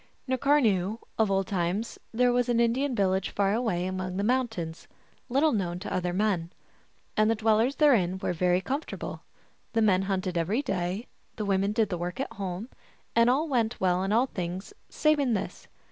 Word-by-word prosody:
N 260 Hz, -, +1 dB
karnayoo, 225 Hz, -9 st, +2 dB, 0.2 s
of 220 Hz, -2 st, +3 dB
old 195 Hz, 0 st, +1 dB
times, 190 Hz, +4 st, -2 dB
there 245 Hz, +1 st, +3 dB
was 245 Hz, 0 st, +1 dB
an 235 Hz, -1 st, +2 dB
Indian 245 Hz, +3 st, +1 dB
village 190 Hz, -2 st, +1 dB
far 200 Hz, 0 st, +1 dB
away 215 Hz, -7 st, 0 dB
among 185 Hz, 0 st, -3 dB
the 200 Hz, -, 0 dB
mountains, 225 Hz, -9 st, -1 dB, 0.4 s
little 280 Hz, +5 st, +3 dB
known 180 Hz, -7 st, -1 dB
to 190 Hz, -, -5 dB
other 180 Hz, -1 st, 0 dB
men. 180 Hz, -3 st, 0 dB, 0.6 s
And 215 Hz, 0 st, +3 dB
the 225 Hz, -, +3 dB
dwellers 225 Hz, +4 st, +2 dB
therein 210 Hz, -, +3 dB
were 185 Hz, -, -2 dB
very 180 Hz, +1 st, +2 dB
comfortable: 275 Hz, +9 st, -4 dB, 0.5 s
the 225 Hz, -, +2 dB
men 190 Hz, -3 st, +4 dB
hunted 185 Hz, -2 st, -1 dB
every 205 Hz, -, 0 dB
day, 185 Hz, +1 st, -2 dB, 0.3 s
the 215 Hz, -, -3 dB
women 195 Hz, 0 st, +1 dB
did 215 Hz, 0 st, +1 dB
the 180 Hz, -, -3 dB
work 175 Hz, +5 st, -4 dB
at 270 Hz, -, -3 dB
home, 195 Hz, +3 st, -5 dB, 0.5 s
and 230 Hz, +1 st, +5 dB
all 285 Hz, +6 st, +2 dB
went 240 Hz, -5 st, 0 dB
well 185 Hz, 0 st, +2 dB
in 195 Hz, -, -1 dB
all 235 Hz, +4 st, +4 dB
things 185 Hz, -, -5 dB, 0.2 s
save 305 Hz, -1 st, +2 dB
in 255 Hz, -5 st, +2 dB
this. 195 Hz, -, -5 dB
205 Hz, 185 wpm, -28 LUFS, 185-240 Hz, 0.6 s, and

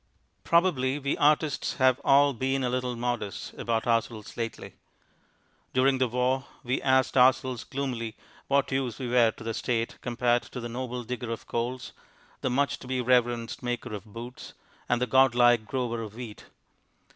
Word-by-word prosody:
Probably 150 Hz, -6 st, +2 dB
we 140 Hz, -1 st, -1 dB
artists 150 Hz, 0 st, +2 dB
have 130 Hz, -1 st, +3 dB
all 140 Hz, +1 st, +5 dB
been 130 Hz, +2 st, -1 dB
a 125 Hz, -, 0 dB
little 125 Hz, -1 st, -1 dB
modest 120 Hz, -4 st, -3 dB
about 115 Hz, -1 st, -1 dB
ourselves 115 Hz, -2 st, -1 dB
lately. 115 Hz, -1 st, -5 dB, 1.0 s
During 130 Hz, +1 st, +3 dB
the 130 Hz, -, +3 dB
war 125 Hz, +3 st, 0 dB, 0.2 s
we 125 Hz, +2 st, -1 dB
asked 130 Hz, -1 st, +2 dB
ourselves 130 Hz, -1 st, +3 dB
gloomily 125 Hz, -5 st, -4 dB, 0.3 s
what 140 Hz, 0 st, +2 dB
use 130 Hz, -4 st, -1 dB
we 125 Hz, -2 st, -4 dB
were 120 Hz, -2 st, +5 dB
to 110 Hz, -, -9 dB
the 115 Hz, 0 st, -3 dB
State 115 Hz, 0 st, -2 dB
compared 120 Hz, 0 st, 0 dB
with 125 Hz, -, -6 dB
the -, -, -3 dB
noble 125 Hz, 0 st, -4 dB
digger 120 Hz, 0 st, -5 dB
of 115 Hz, -, -5 dB
coals, 120 Hz, +2 st, -3 dB, 0.5 s
the 130 Hz, -, 0 dB
much 140 Hz, +3 st, 0 dB
to -, -, -11 dB
be 130 Hz, 0 st, -1 dB
reverenced 120 Hz, -2 st, +1 dB
maker 120 Hz, -3 st, -3 dB
of 100 Hz, -3 st, -6 dB
boots, 115 Hz, +4 st, -9 dB, 0.3 s
and 120 Hz, -, +2 dB
the 125 Hz, -, +1 dB
god 130 Hz, 0 st, +4 dB
like 120 Hz, -2 st, +5 dB
grower 120 Hz, -2 st, -2 dB
of 110 Hz, -1 st, -7 dB
wheat. 115 Hz, -3 st, -8 dB
125 Hz, 170 wpm, -28 LUFS, 115-130 Hz, 1.0 s, all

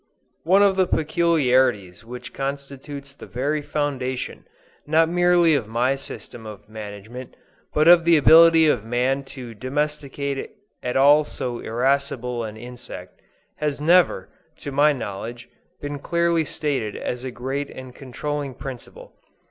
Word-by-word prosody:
One 190 Hz, +4 st, +5 dB
of 195 Hz, -1 st, +3 dB
the 185 Hz, -1 st, +3 dB
peculiarities 130 Hz, -, +1 dB
which 125 Hz, +2 st, -9 dB
constitutes 140 Hz, 0 st, -6 dB
the -, -, -12 dB
very 145 Hz, +5 st, -2 dB
foundation, 135 Hz, -4 st, -3 dB, 0.4 s
not 160 Hz, +2 st, +4 dB
merely 175 Hz, -1 st, +4 dB
of 130 Hz, -8 st, 0 dB
my 120 Hz, +4 st, +1 dB
system 120 Hz, -4 st, -8 dB
of 105 Hz, -1 st, -11 dB
management, 110 Hz, +3 st, -9 dB, 0.4 s
but 155 Hz, +1 st, +2 dB
of 170 Hz, -1 st, +8 dB
the 170 Hz, -1 st, +5 dB
ability 160 Hz, +4 st, +7 dB
of 125 Hz, -8 st, +2 dB
man 125 Hz, +4 st, 0 dB
to 125 Hz, -3 st, -9 dB
domesticate 140 Hz, +2 st, -3 dB, 0.3 s
at 125 Hz, +1 st, -2 dB
all 145 Hz, +3 st, +6 dB
so 125 Hz, -4 st, -5 dB
irascible 125 Hz, 0 st, -1 dB
an 110 Hz, -1 st, -7 dB
insect, 120 Hz, -6 st, -10 dB, 0.4 s
has 150 Hz, -2 st, -2 dB
never, 165 Hz, -, +3 dB, 0.3 s
to 145 Hz, -, -7 dB
my 145 Hz, +2 st, +4 dB
knowledge, 120 Hz, -1 st, -6 dB, 0.3 s
been 145 Hz, 0 st, -5 dB
clearly 170 Hz, +1 st, +1 dB
stated 140 Hz, -9 st, -2 dB
as 125 Hz, 0 st, -4 dB
a 130 Hz, -, -4 dB
great 135 Hz, +3 st, -4 dB
and 130 Hz, -1 st, -10 dB
controlling 140 Hz, +1 st, -5 dB
principle. 130 Hz, -2 st, -9 dB
135 Hz, 135 wpm, -23 LUFS, 120-150 Hz, 0.4 s, of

